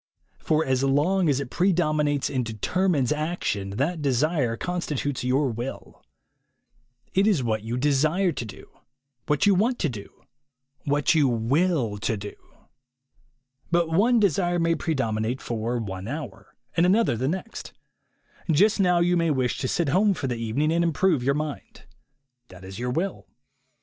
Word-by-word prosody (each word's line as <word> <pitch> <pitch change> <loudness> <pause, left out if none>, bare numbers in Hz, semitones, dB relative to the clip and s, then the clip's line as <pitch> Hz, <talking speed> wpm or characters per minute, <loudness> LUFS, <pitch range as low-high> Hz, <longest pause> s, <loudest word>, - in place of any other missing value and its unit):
For 155 0 +1
as 130 0 0
long 155 +6 +2
as 140 -2 +2
it 140 -3 -5
predom 175 -5 +1
inates 145 -2 0
and 130 -2 0
determines 135 - 0
action, 150 - -2
that 155 +5 -1
desire 140 -2 +1
constitutes 150 -6 -3
your 130 +1 +1
will. 120 +4 -7 1.1
It 195 +2 +3
is 185 -12 +2
what 110 -2 -1
you 115 +3 -4
desire 155 +7 +2
to 130 - -5
do, 105 -4 -11 0.6
what 150 +7 +2
you 205 - +5
want 230 +7 +1
to 160 - 0
do, 105 -5 -10 0.6
what 145 +2 +2
you 150 -4 +4
will 120 - 0
to 110 +1 -1
do. 100 +1 -7 1.4
But 170 -1 +1
one 230 +8 +4
desire 175 -3 +1
may 165 -1 +2
predominate 125 -7 -1
for 115 +1 -3
one 95 -4 -5
hour, 150 +5 -7 0.2
and 170 +2 +4
another 210 - +3
the 130 +4 -2
next. 190 +8 -5 0.8
Just 205 +8 +3
now 180 -2 +3
you 175 +1 +3
may 165 -1 +1
wish 130 -4 0
to 135 - -1
sit 165 +2 0
home 195 +6 +3
for 145 - -4
the 125 -2 -1
evening 115 +7 -1
and 170 +1 +2
improve 170 -2 +2
your 140 +3 +1
mind. 150 -1 -6 0.6
That 95 0 -13
is 95 +3 -8
your 125 +1 -2
will. 175 +9 -3
145 Hz, 160 wpm, -25 LUFS, 125-175 Hz, 1.4 s, you